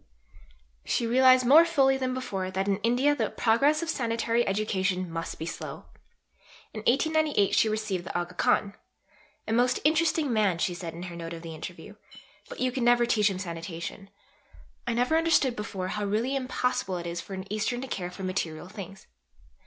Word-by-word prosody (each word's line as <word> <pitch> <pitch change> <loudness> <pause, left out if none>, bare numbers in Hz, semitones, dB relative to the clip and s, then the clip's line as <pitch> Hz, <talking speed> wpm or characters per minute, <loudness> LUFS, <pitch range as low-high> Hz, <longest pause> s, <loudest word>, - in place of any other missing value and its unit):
She 235 - 0
realized 255 +1 +5
more 295 +7 +8
fully 275 -6 +3
than 260 -1 -1
before 200 -8 -3
that 190 +1 -2
in 195 -1 +2
India 245 +7 +2
the 290 - -1
progress 280 +8 +2
of 330 - -4
sanitary 230 -2 0
education 190 -3 -1
must 165 0 -5
be 160 - -5
slow. - - -7 0.9
In 215 - -5
1898 300 -4 +2
she 220 - +4
received 215 -5 -2
the - - -3
Aga 175 +1 -5
Khan. 200 +2 +1 0.7
"A 220 - -1
most 250 +2 +2
interesting 310 -3 +2
man," 205 -5 +2
she 175 +1 0
said 170 -2 -7
in 170 - -7
her 175 -1 -7
note 165 0 -6
of 165 0 -8
the 165 -1 -7
interview; 155 - -9 0.5
"but - - -9
you 255 0 +1
could 255 - -3
never 240 0 +4
teach 215 -3 +3
him 190 - -4
sanitation. 170 +1 -6 0.8
I 235 - 0
never 250 +6 +2
understood 320 -6 +2
before 195 -3 -4
how 210 +1 -2
really 225 +7 0
impossible 250 -7 -1
it 170 - -6
is 170 0 -4
for 195 - -8
an 190 0 -6
Eastern 230 +3 -1
to 265 - -5
care 180 -7 -4
for 185 +2 -9
material 175 -3 -3
things. 195 -1 -9
215 Hz, 185 wpm, -27 LUFS, 185-255 Hz, 0.9 s, more